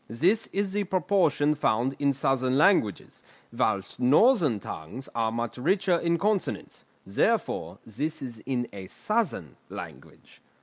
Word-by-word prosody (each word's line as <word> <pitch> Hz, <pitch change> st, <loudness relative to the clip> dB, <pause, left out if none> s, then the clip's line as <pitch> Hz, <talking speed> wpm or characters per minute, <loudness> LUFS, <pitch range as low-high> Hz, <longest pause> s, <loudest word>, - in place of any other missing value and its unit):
This 180 Hz, -, +2 dB
is 195 Hz, -1 st, -2 dB
the 205 Hz, 0 st, 0 dB
proportion 175 Hz, -5 st, +2 dB
found 130 Hz, -2 st, 0 dB
in 140 Hz, -1 st, +3 dB
southern 130 Hz, -1 st, +1 dB
languages, 150 Hz, -, +2 dB, 0.3 s
whilst 100 Hz, -5 st, -1 dB
northern 150 Hz, -, +4 dB
tongues 100 Hz, +9 st, -8 dB
are 115 Hz, -1 st, 0 dB
much 120 Hz, 0 st, -4 dB
richer 185 Hz, +4 st, +2 dB
in 170 Hz, 0 st, +1 dB
consonants; 205 Hz, +2 st, -2 dB, 0.2 s
therefore -, -, 0 dB
this 150 Hz, +8 st, -3 dB
is 120 Hz, -4 st, -7 dB
in 125 Hz, -3 st, -1 dB
a 95 Hz, -2 st, -8 dB
southern 185 Hz, -, -2 dB
language." -, -, -11 dB
140 Hz, 130 wpm, -27 LUFS, 115-185 Hz, 0.3 s, northern